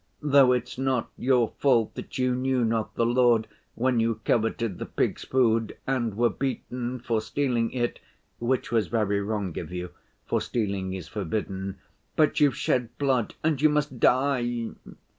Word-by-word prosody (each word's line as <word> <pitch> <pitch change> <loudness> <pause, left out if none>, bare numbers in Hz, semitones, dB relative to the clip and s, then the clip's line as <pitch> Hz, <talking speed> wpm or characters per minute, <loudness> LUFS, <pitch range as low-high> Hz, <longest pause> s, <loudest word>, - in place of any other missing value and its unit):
Though 140 -3 +6
it's 125 0 -1
not 130 -3 0
your 125 -3 +2
fault 120 -6 +3
that - - -7
you 130 -1 +2
knew 130 -1 +1
not 110 -1 -1
the 115 - +2
Lord, 120 -2 +3 0.3
when 125 0 +1
you 115 -1 +1
coveted 115 -3 0
the - - -4
pigs' - - -1
food 115 -4 +1
and 120 -6 -1
were 120 -1 +3
beaten 125 0 -3
for 115 -2 -1
stealing 120 -2 0
it 120 -2 -2 0.4
(which 125 +2 -1
was 115 -2 +2
very 105 -3 0
wrong 100 -4 -3
of - - -7
you, 90 0 -5 0.3
for - - 0
stealing 100 -5 -2
is 90 -4 -7
forbidden); 95 -1 -3 0.4
but 155 -1 +3
you've 145 -5 +4
shed 120 -2 -1
blood 130 -5 0
and 155 -3 +1
you 155 - +6
must 150 -4 -1
die. 120 -3 +2
120 Hz, 160 wpm, -26 LUFS, 110-130 Hz, 0.4 s, Though